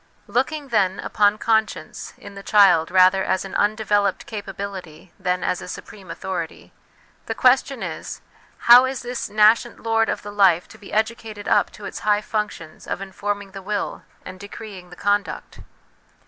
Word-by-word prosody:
Look 245 +7 0
ing, 300 -3 -7
then, 195 -5 +1
upon 205 0 +2
conscience 220 -1 -1
in 200 - -12
the 195 - -9
child 195 -6 +5
rather 185 +1 +5
as 185 +1 -1
an 195 - -9
undeveloped 205 -2 +1
capability 195 -5 -7
than 180 -1 -1
as 180 - -1
a - - -8
supreme 190 +1 -10
authority, 180 -3 -6 0.5
the - - -2
question - - +3
is, - - -6 0.5
how 245 +2 +9
is 260 0 -4
this 245 0 -4
nascent 215 +3 +3
lord 225 -1 +2
of - - -3
the 205 - -7
life 190 -4 +3
to - - -15
be 200 - -12
educated 220 -1 -2
up - - +3
to 205 - -10
its - - -6
high 210 0 +2
functions 210 -7 -5
of - - -3
informing 200 +1 -4
the 195 0 -8
will 205 +1 -3 0.2
and 185 0 -9
decreeing 200 -2 -10
the 180 - -12
conduct 205 +1 -2
205 Hz, 165 wpm, -22 LUFS, 190-215 Hz, 0.5 s, how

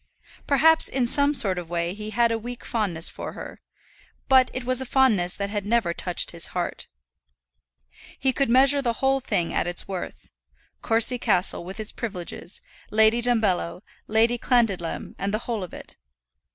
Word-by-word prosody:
Perhaps 320 +3 +4
in 260 -2 0
some 285 +4 +2
sort 190 -8 +1
of 170 -2 -9
way 170 0 -2
he 210 +1 -7
had 235 +2 +2
a 230 - 0
weak 240 +1 -8
fondness 190 -8 -1
for - - -7
her; - - -10 0.7
but 260 -2 +5
it 255 - -5
was 255 +1 +2
a - - -4
fondness 220 -10 +2
that 200 0 -4
had 205 -1 -3
never 215 -4 0
touched 180 0 0
his 170 -1 +2
heart. 175 - -3 1.3
He 265 -1 0
could 275 -2 0
measure 275 +3 +5
the 240 -3 0
whole 270 +3 +1
thing 175 -9 -2
at - - 0
its 175 0 -2
worth, 190 -2 -7 0.5
Courcy 230 +2 +2
Castle 190 -7 +1
with 190 +5 -8
its 215 0 -4
privileges, 185 -4 -6 0.3
Lady 220 +2 +3
Dumbello, 215 -7 +1 0.3
Lady 230 +2 +2
Clandidlem, 215 -10 0
and 200 - -2
the 215 - 0
whole 225 -5 -3
of 180 - -8
it. - - -10
220 Hz, 170 wpm, -24 LUFS, 185-250 Hz, 1.3 s, but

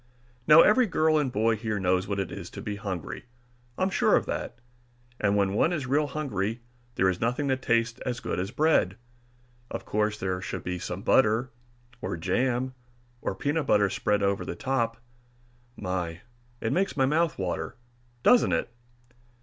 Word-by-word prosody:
Now 155 +2 +9
every 235 +3 +5
girl 155 -4 +3
and 140 -4 0
boy 110 +1 +2
here 110 -1 -2
knows 95 0 +1
what 100 -1 -2
it 95 - -3
is 85 - -7
to 100 - -8
be 105 -3 -3
hungry, 100 -3 -5 0.5
I'm 185 +1 +1
sure - - +3
of - - +2
that. - - -4 0.6
And 105 0 +2
when 100 -1 +2
one 155 - +2
is 155 -6 -2
real 145 +4 +1
hungry 120 -7 -3 0.3
there 95 - +3
is 95 -1 0
nothing 125 +5 0
that 130 0 0
tastes 115 -1 +1
as 125 -2 -3
good - - -3
as 95 +2 -2
bread. 135 - +2 0.7
Of - - -6
course 105 0 0
there 95 -1 -2
should - - -5
be 90 0 -3
some 90 +3 -5
butter, 120 +1 +3 0.5
or 85 - -3
jam, 125 +9 0 0.5
or - - -2
peanut 145 0 -1
butter 100 -2 +3
spread 105 0 0
over 100 0 +1
the - - -5
top 120 -4 -1 0.8
my, 90 -3 -3 0.4
it 115 - 0
makes 195 +2 +1
the 135 -2 +2
mouth 160 +4 +1
water, - - -3 0.5
doesn't 245 - +5
it! - - -1
115 Hz, 175 wpm, -27 LUFS, 100-135 Hz, 0.8 s, Now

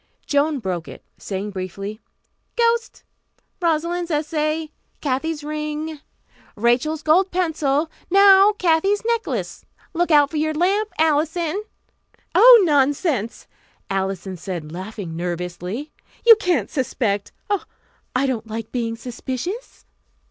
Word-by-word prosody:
Joan 290 +1 +1
broke 185 -8 -4
it, - - -11 0.2
saying 200 +1 -4
briefly, 195 +3 -6 0.6
"Ghost. 465 0 0 0.6
Rosalind's 340 +1 0
essay. 305 0 -1 0.3
Kathy's 295 +3 -2
ring. 305 +1 -4 0.6
Rachel's 255 +8 +1
gold 360 +5 +4
pencil. 315 -4 0 0.2
Now, 395 +2 +7
Kathy's 390 +3 +1
necklace. 465 -1 -2 0.3
Look 350 +1 0
out 290 -3 +5
for 315 - -3
your 310 +1 0
lamp, 395 +6 +1
Alison!" 320 +5 +1 0.7
"Oh, 485 -3 +9
nonsense," 280 - +1 0.5
Alison 190 -1 -2
said 170 -4 -6
laughing 185 -1 -6
nervously. 180 - -4 0.3
"You 460 -1 +10
can't 350 - 0
suspect 215 -7 -1 0.2
Oh, 405 - 0 0.5
I 260 +2 +2
don't 235 -4 -2
like 225 0 -6
being 230 -2 -2
suspicious." 255 - -6
300 Hz, 110 wpm, -21 LUFS, 220-345 Hz, 0.7 s, You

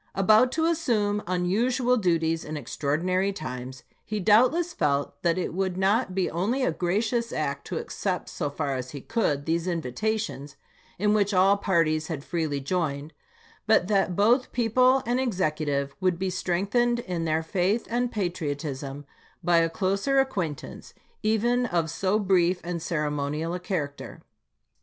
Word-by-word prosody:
About 215 +6 +5
to 320 0 +1
assume 225 -11 +1
unusual 235 +8 +1
duties 165 -6 +1
in 155 - -6
extraor 145 +2 -2
dinary 185 +3 0
times, 130 -3 -6 0.2
he 215 -1 -3
doubtless 255 - +4
felt 140 0 -1
that 170 0 +1
it 180 - -2
would 185 0 -1
not 200 +5 +2 0.2
only 200 - 0
be - - +2
a - - +2
gracious 220 +8 -1
act 140 -2 -3
to - - -3
accept, - - -3
so 145 - -3
far 140 -1 -2
as 130 0 -4
he 140 0 -8
could, 145 - -1
these 165 +2 0
invitations, 170 - -2 0.4
in 210 +2 +2
which 205 -1 +2
all 190 +2 +5
parties 165 -6 +1
had 155 -5 -4
freely 160 -5 -2
joined, 150 -1 -2 0.5
but 215 -5 +4
that 195 -3 +2
both 235 +7 +3
people 255 +3 +3
and 245 +2 +1
Executive 155 - -1
would 185 -2 +1
be 190 +1 -2
strengthened 200 +7 +1
in 175 -5 -3
their 160 0 0
faith 190 +6 0
and 245 +1 -1
patriotism 145 -7 -4 0.4
by 175 0 +4
a 165 0 +3
closer 195 +10 +1
acquaintance, 185 - -3 0.3
even 240 +3 +1
of 170 -5 0
so 195 +4 +1
brief 185 -3 +2
and 170 -1 -4
ceremonial 150 0 -2
a 180 - -3
character. 155 -6 -5
180 Hz, 150 wpm, -26 LUFS, 155-215 Hz, 0.5 s, About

